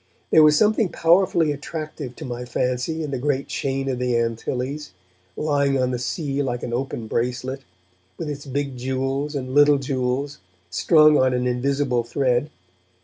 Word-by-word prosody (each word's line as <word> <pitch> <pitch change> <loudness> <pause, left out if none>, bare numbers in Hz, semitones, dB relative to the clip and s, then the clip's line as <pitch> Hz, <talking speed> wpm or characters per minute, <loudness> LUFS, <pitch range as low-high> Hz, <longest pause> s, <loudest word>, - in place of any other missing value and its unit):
There 160 - +7
was 150 -1 +6
something 215 0 +3
powerfully 170 -2 +3
attractive 145 -2 -6
to - - -8
my 125 -1 -5
fancy 125 +6 -2
in 150 - -4
the 135 - -2
great 140 0 -1
chain 135 0 -2
of 130 -2 -2
the 125 -1 +1
Antilles, 125 +4 -3 0.4
lying 140 -2 +1
on 125 0 +1
the 125 - -2
sea 140 +2 -2
like 125 -3 -3
an 120 - -4
open 125 -2 -3
bracelet, 125 +4 -2 0.6
with 160 - -5
its 145 -1 -6
big 140 -1 -3
jewels 135 +3 -2
and 130 -2 -4
little 145 0 +6
jewels 135 0 -2 0.3
strung 150 - +5
on 130 -1 +3
an 125 0 -1
invisible 125 0 0
thread. 125 +3 0
135 Hz, 160 wpm, -23 LUFS, 125-145 Hz, 0.6 s, There